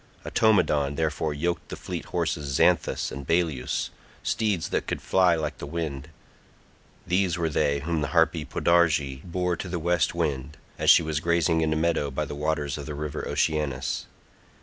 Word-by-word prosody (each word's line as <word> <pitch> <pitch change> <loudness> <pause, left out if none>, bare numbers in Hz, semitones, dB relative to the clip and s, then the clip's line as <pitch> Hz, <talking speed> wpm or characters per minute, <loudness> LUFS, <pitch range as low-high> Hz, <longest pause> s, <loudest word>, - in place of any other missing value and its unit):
Automedon 75 -10 +2
therefore 80 0 -1
yoked 85 +3 -2
the - - -5
fleet - - -6
horses 70 -3 -2
Xanthus - - +2
and 70 0 -7
Balius, 80 -6 0 0.3
steeds 105 -7 0
that - - -1
could - - -2
fly 90 -2 +3
like 80 -1 -3
the - - -6
wind: 75 -3 -4 1.0
these 90 -1 +1
were 85 -2 0
they 70 -2 +1
whom 80 +1 -1
the 75 - 0
harpy 80 0 +2
Podarge 75 -6 +2
bore 90 0 -1
to 90 - -6
the 90 - -2
west 85 0 +1
wind, 75 -4 -2 0.2
as - - +2
she - - +8
was 80 -1 -1
grazing 85 0 +2
in 80 -1 +1
a - - +1
meadow 80 -2 +1
by 65 - -2
the - - -6
waters 75 -1 -1
of 70 - -7
the 75 - -5
river 75 0 -4
Oceanus. 70 -5 -1
80 Hz, 170 wpm, -26 LUFS, 75-85 Hz, 1.0 s, she